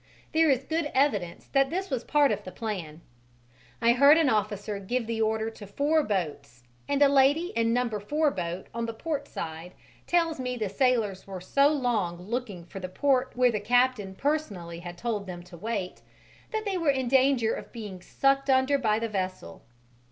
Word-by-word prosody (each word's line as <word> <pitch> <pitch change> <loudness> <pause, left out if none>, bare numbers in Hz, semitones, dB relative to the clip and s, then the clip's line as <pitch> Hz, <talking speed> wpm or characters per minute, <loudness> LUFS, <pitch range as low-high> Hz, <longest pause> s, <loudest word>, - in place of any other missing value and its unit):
There 320 0 +4
is 265 -1 +2
good 320 0 -1
evidence 210 -11 +1
that 275 -1 +3
this 375 +1 -3
was 250 -3 -1
part 295 -2 +3
of - - -2
the 185 - -8
plan: 175 -9 -5 0.8
I 235 +1 +6
heard 280 +5 +7
an 320 -5 +3
officer 210 -1 -1
give 235 +5 -2
the 225 0 -2
order 220 0 0
to 210 -2 -11
four 290 +10 +2
boats 145 - -3 0.3
and 285 0 +3
a - - +7
lady 280 +5 +3
in 230 0 +2
number 235 -3 0
4 295 +8 +1
boat 175 -2 -4
on 230 0 -2
the 230 - -5
port 290 +1 -3
side 165 +2 -7 0.3
tells 335 -4 +1
me 250 -1 -3
the 215 -4 -2
sailors 215 -4 0
were 190 -1 -6
so 275 +10 +3
long 235 - 0
looking 205 -3 -5
for 195 - -8
the 185 -1 -5
port 260 +5 +1
where 250 0 +4
the 210 - -1
captain 240 -3 +1
personally 200 - -2
had 175 0 -8
told 210 -2 -3
them 175 -1 -7
to 180 0 -13
wait, 195 0 -4 0.5
that 440 -1 -3
they 390 -3 -1
were 330 -3 +1
in 265 -2 +1
danger 260 -3 +3
of - - -7
being 205 -6 -8
sucked 275 +7 +1
under 265 +2 +3
by 215 -4 +2
the 230 +1 -1
vessel. 185 - -4
230 Hz, 190 wpm, -27 LUFS, 195-275 Hz, 0.8 s, heard